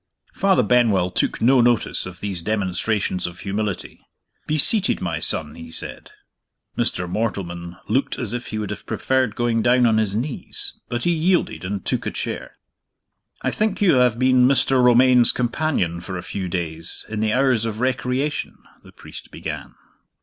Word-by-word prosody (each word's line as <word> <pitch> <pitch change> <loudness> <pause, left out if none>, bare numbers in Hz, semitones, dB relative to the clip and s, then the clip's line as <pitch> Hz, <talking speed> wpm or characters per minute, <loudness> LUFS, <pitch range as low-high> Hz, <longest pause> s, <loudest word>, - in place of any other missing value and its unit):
Father 190 -10 +3
Benwell 105 -6 +3
took - - -1
no 130 +1 +5
notice 120 -6 +1
of 90 -1 -11
these 95 -4 -2
demonstrations 100 -1 -1
of 85 0 -10
humility. 100 0 -4 0.5
"Be 155 - 0
seated, 200 +7 +2
my 85 -2 -2
son," 75 -2 0
he 80 0 -10
said. 80 - -2 0.7
Mr. 90 - -1
Mortleman 85 -4 -4
looked 130 +7 0
as 120 -3 -3
if 120 0 -4
he 110 - -4
would 105 -1 -3
have - - -8
preferred 130 -4 0
going 120 -1 +1
down 125 +1 +4
on 110 -2 +3
his 105 -2 0
knees, 125 +5 0 0.2
but 120 0 -2
he 175 - +2
yielded, 170 - +1
and 95 +1 -4
took - - -1
a - - +1
chair. - - -5 0.9
"I - - 0
think 210 -3 -1
you 180 -9 +4
have 125 -2 +3
been 130 0 +4
Mr. 130 -1 +3
Romayne's 125 0 +6
companion 120 - -1
for 95 +1 -6
a 90 - -6
few 95 -2 -4
days, 85 -1 -3
in 110 -1 -4
the 110 0 +1
hours 125 -4 +2
of 110 -1 -5
recreation?" 130 +3 -1 0.3
the - - -15
priest - - -11
began. - - -7
115 Hz, 170 wpm, -22 LUFS, 95-130 Hz, 0.9 s, Romayne's